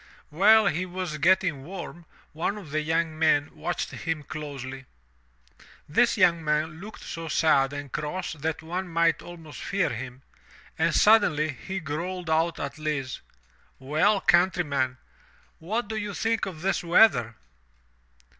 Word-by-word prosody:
While 210 +7 +6
he 180 -2 +1
was 180 -4 -4
getting 175 -3 +2
warm, 175 0 -8 0.3
one 175 +6 -2
of 175 -8 -10
the 155 +1 0
young 160 0 -1
men 155 -2 +2
watched 175 - -3
him 165 -2 -4
closely. 135 -3 -7 1.0
This - - +3
young 170 -2 +4
man 155 +1 -1
looked 215 +2 -10
so 165 0 -6
sad 150 -4 +3
and 145 -2 -7
cross 150 +5 -3
that 160 +1 -4
one 180 +3 -4
might 170 -1 +2
almost 165 -3 -10
fear 195 -5 0
him, 125 +2 -7 0.5
and - - +1
suddenly 155 -8 +4
he 190 +7 -5
growled 170 +3 -4
out 165 +1 +1
at 140 +2 -5
Lise, 145 -4 -3 0.6
"Well, 155 +10 +2
countryman, 150 -8 +2 0.6
what 215 +8 -2
do 220 - -4
you 205 -2 -4
think 225 -1 0
of 165 -5 -8
this 195 -1 0
weather?" 165 - +4
160 Hz, 140 wpm, -26 LUFS, 150-185 Hz, 1.0 s, While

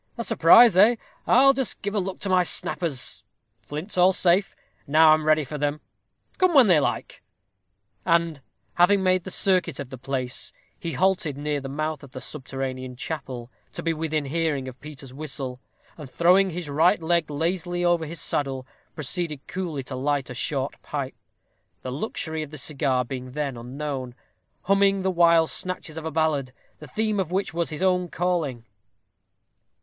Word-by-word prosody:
A 235 - -2
surprise, 225 +1 +7
eh! 215 +5 +7 0.3
I'll 270 +3 +6
just 265 -4 -3
give 205 0 -2
a 210 - +1
look 190 0 -3
to 200 - -2
my 185 -1 +4
snappers 155 -4 -2 0.4
flints 160 +6 -5
all 185 +2 +6
safe. 185 +2 +2 0.3
Now 155 +2 +6
I'm 155 0 0
ready 155 0 +4
for 150 +2 -6
them, 145 +1 -1 0.6
come 370 -3 +3
when 270 -3 +8
they 175 -7 +5
like." - - -3 0.8
And, 170 -4 +1 0.3
having 190 +3 +4
made 185 -1 +2
the - - -5
circuit 185 -6 +1
of 140 -3 -6
the 130 - -8
place, 130 -1 -4 0.3
he 170 - -4
halted 180 -6 +1
near 145 0 -2
the 135 - -6
mouth 155 +1 -3
of 140 -2 -14
the 130 - -6
subterranean 130 -1 -5
chapel, 130 -4 -6 0.2
to - - -6
be 165 - +1
within 155 -2 -2
hearing 145 -2 -1
of 130 -1 -10
Peter's 140 -3 -10
whistle, 135 -3 -5 0.4
and, 145 -4 -8
throwing 180 +6 +4
his 175 -2 -5
right 165 +7 +3
leg 165 -1 +1
lazily 175 +3 -1
over 170 -2 +2
his 165 +1 -7
saddle, 135 -3 -2 0.3
proceeded 155 -1 -2
coolly 170 -7 -4
to 130 +1 -6
light 135 0 -1
a - - -4
short 135 +1 -2
pipe 140 -3 -4 0.7
the 130 - -4
luxury 160 - -3
of 155 - -6
the 155 - -9
cigar 135 -3 0
being 130 0 -7
then 145 -3 -2
unknown, 130 +1 -5 0.5
humming 195 0 +3
the 190 - +1
while 170 -2 +5
snatches 185 -1 -4
of 160 -1 -6
a 160 - -3
ballad, 150 -5 0 0.3
the 150 - -10
theme 215 +7 -1
of 185 -4 -1
which 190 0 -1
was 170 0 -1
his 155 +4 -4
own 180 -1 +2
calling. 165 -9 -2
155 Hz, 175 wpm, -25 LUFS, 140-180 Hz, 0.8 s, when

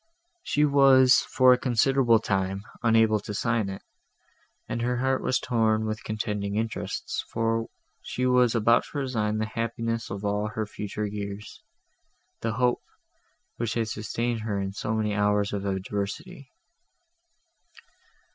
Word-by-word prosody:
She 150 - +2
was, 135 -3 +6
for 130 -1 +4
a 125 - +1
considerable 125 -1 +3
time, 95 -2 -1 0.2
unable 115 -2 +4
to 105 0 -7
sign 115 -2 0
it, 95 - -7 0.8
and 115 - -3
her 125 +1 0
heart 130 +1 +1
was 130 - +1
torn 110 -2 +1
with 110 0 -4
contending 105 -2 -3
interests, 110 +1 -3
for 115 0 0 0.3
she 125 - -3
was 125 -2 +3
about 115 +1 +4
to - - -8
resign 110 -6 -1
the 110 - 0
happiness 115 0 -3
of 100 +1 -5
all 105 +1 0
her 110 +1 -3
future 105 0 -5
years—the 105 +2 -8
hope, 125 +2 +1 0.8
which 115 -1 -2
had 115 -2 -1
sustained 115 +2 -2
her 105 -2 -2
in 95 0 -3
so 110 +2 -2
many 105 -1 0
hours 105 0 +1
of 100 -1 -3
adversity. 100 +7 -4
110 Hz, 135 wpm, -26 LUFS, 105-120 Hz, 0.8 s, was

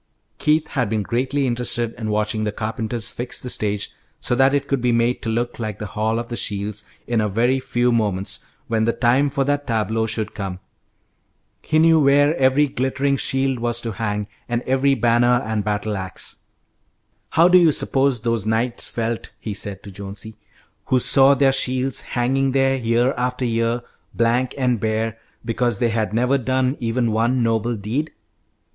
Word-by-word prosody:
Keith 155 +1 +2
had 125 -7 -1
been 110 -1 0
greatly 130 +5 0
interested 120 -1 -1
in 110 -2 -5
watching 105 +1 0
the 105 - -1
carpenters 110 +1 -3
fix 120 +1 -4
the 125 - -4
stage 105 -1 -1 0.3
so - - -1
that 135 +2 +4
it 140 -1 0
could 140 -3 0
be 125 0 +2
made 120 +1 +1
to 115 - -3
look 120 +2 -2
like 110 -3 -4
the 105 - -5
Hall 110 +1 0
of 120 0 -3
the 120 - -3
Shields 105 -1 -2 0.2
in 120 -2 +1
a 105 - 0
very 120 +6 +2
few 120 -1 0
moments, 100 -3 -1 0.2
when 110 -2 +1
the 115 - +2
time 130 +4 +2
for 140 0 0
that 145 +1 -1
tableau 110 -1 0
should 110 -1 -3
come. 95 -3 -5 1.0
He 155 - 0
knew 160 0 +5
where 145 +2 +4
every 135 +3 +4
glittering 135 +1 0
shield 135 -1 0
was 120 0 -1
to 115 - -3
hang, 105 -1 -3 0.2
and 120 0 -1
every 135 +1 +2
banner 120 +1 +3
and 110 -1 -1
battle 105 0 -2
axe. 95 -2 -6 0.9
"How 165 +2 +5
do 180 0 +7
you 170 -3 +5
suppose 135 -4 +1
those 115 -2 0
knights 115 +3 0
felt," 115 0 -3
he 110 - -5
said 100 -1 -4
to 100 - -9
Jonesy, 100 +2 -7 0.5
"who 130 - +2
saw 135 +2 +5
their 135 0 +3
shields 130 0 0
hanging 130 +2 0
there 135 0 +3
year 120 +1 +1
after 125 +1 -1
year, 115 +1 0 0.3
blank 120 +2 +1
and 125 -4 +1
bare, 110 0 -1 0.3
because 120 -1 0
they 120 - +1
had 110 -3 -1
never 125 +5 +2
done 130 +1 0
even 115 0 0
one 120 +3 +1
noble 115 +1 0
deed? 115 +10 -2
120 Hz, 180 wpm, -21 LUFS, 110-130 Hz, 1.0 s, do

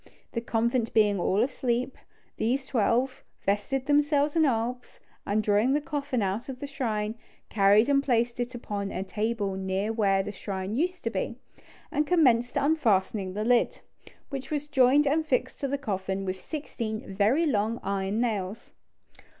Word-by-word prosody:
The 230 - -2
convent 235 0 0
being 205 -3 +4
all 195 +5 +2
asleep, 255 0 -1 0.4
these 260 +4 0
twelve 255 +1 0 0.2
vested 210 +7 0
themselves 290 0 +2
in 320 -1 +4
albs, 245 -1 -2 0.3
and 215 +2 +1
drawing 210 +5 +3
the 295 - +3
coffin 285 -5 -2
out 200 +7 -2
of 255 -1 -6
the 285 - -4
shrine, 220 -7 -2 0.4
carried 205 +2 +5
and 280 -1 +4
placed 240 -3 0
it 245 +1 -3
upon 205 -4 -4
a 185 - -3
table 210 0 -2
near 190 +3 -1
where 195 -3 +2
the 205 - -5
shrine 190 0 -5
used 360 +8 -1
to - - -1
be, - - -2 0.6
and 300 -1 0
commenced 250 -9 +3
unfastening 210 -10 +1
the 210 - -1
lid, 245 0 +2 0.5
which 270 -2 -5
was 295 -1 -2
joined 270 +1 +4
and 310 +3 +1
fixed 255 -2 0
to 280 - -1
the 280 +1 -1
coffin 195 -6 -3
with 185 0 -4
sixteen 225 -9 -5
very 220 - +3
long 225 -4 0
iron 195 +2 -1
nails. 215 -2 -2
235 Hz, 160 wpm, -27 LUFS, 205-275 Hz, 0.6 s, carried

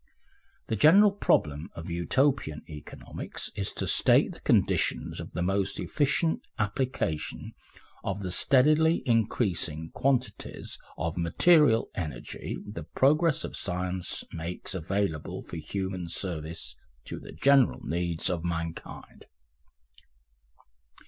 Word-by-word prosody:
The 110 - -1
general 195 - +7
problem 80 - +1
of 80 +1 -7
Utopian 85 - +1
economics 75 -2 -7
is 100 -2 -1
to - - -2
state - - +4
the - - -11
conditions - - +1
of - - -8
the 90 - -1
most 95 +1 0
efficient 150 +3 +1 0.2
application 105 - -2 0.5
of 100 +1 -3
the 90 - -3
steadily 155 - +4
increasing 95 - 0
quantities 130 -6 -2 0.2
of 80 +2 -2
material 115 - +4
energy 75 -9 -5
the 105 - -7
progress 155 +3 +3
of - - -5
science 90 -1 -3
makes 85 +2 -5
available 95 -3 -2
for 85 - -8
human 95 +2 -4
service, 85 -2 -5 0.3
to - - -6
the - - -11
general 140 -2 +4
needs 85 +1 -1
of 85 -3 -1
mankind. 85 -1 -5
95 Hz, 110 wpm, -28 LUFS, 85-130 Hz, 0.5 s, general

